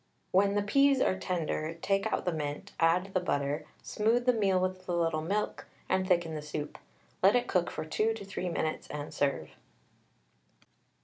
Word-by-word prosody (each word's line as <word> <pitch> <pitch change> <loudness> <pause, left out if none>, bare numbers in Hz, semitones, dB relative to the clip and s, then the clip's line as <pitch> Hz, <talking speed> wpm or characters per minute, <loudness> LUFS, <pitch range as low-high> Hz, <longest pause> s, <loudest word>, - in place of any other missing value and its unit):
When 200 +2 +3
the 205 - +2
peas 275 +6 +4
are 185 - +2
tender, 165 -3 -2
take 195 +3 0
out - - -1
the 180 - +1
mint, 150 -2 -4
add 180 +4 +2
the 185 - +3
butter, 145 -3 -1 0.2
smooth 230 +3 +1
the 250 - +5
meal 195 -4 +2
with 185 0 -3
a - - +1
little 165 -2 +1
milk, 200 +6 -2 0.2
and 185 0 +1
thicken 175 -3 +2
the 155 - -4
soup. 150 0 -5 0.4
Let 195 +4 +6
it 245 - +2
cook 180 -2 +1
for 155 - -5
2 215 +8 0
to 205 -3 -8
3 185 -2 -3
minutes, 160 -2 -2
and 150 0 -6
serve. 140 - -1
185 Hz, 180 wpm, -30 LUFS, 155-200 Hz, 0.4 s, Let